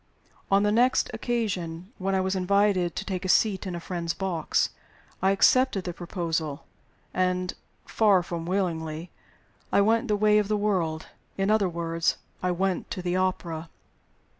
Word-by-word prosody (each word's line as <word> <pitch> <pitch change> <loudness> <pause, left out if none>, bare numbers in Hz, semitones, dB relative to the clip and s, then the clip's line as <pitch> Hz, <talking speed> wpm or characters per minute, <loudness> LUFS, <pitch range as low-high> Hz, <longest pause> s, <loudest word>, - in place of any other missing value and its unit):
On 195 +1 +4
the 210 - +3
next 245 +4 +3
occasion 185 -7 -3
when 195 +1 0
I 190 - +2
was 190 +1 -1
invited 190 -2 +2
to - - -4
take 185 -2 -3
a 185 - -3
seat 200 -1 +3
in 180 - -4
a - - -4
friend's 170 -1 -3
box, 185 -5 0 0.5
I 190 - +3
accepted 195 +1 +4
the 175 - -4
proposal; 165 -4 -3 0.5
and 185 0 0 0.3
(far 200 -5 +3
from 170 -1 -5
willingly) 170 -3 -2 0.6
I - - +4
went 225 +2 +2
the 210 - +2
way 210 0 +4
of 210 - 0
the 210 0 +1
world 180 -7 0 0.3
in 195 +1 +1
other 210 -4 +3
words, 165 0 -1 0.2
I 180 - 0
went 185 +1 -1
to 185 - -5
the 180 0 0
opera. 170 -3 -2
185 Hz, 165 wpm, -26 LUFS, 170-200 Hz, 0.6 s, On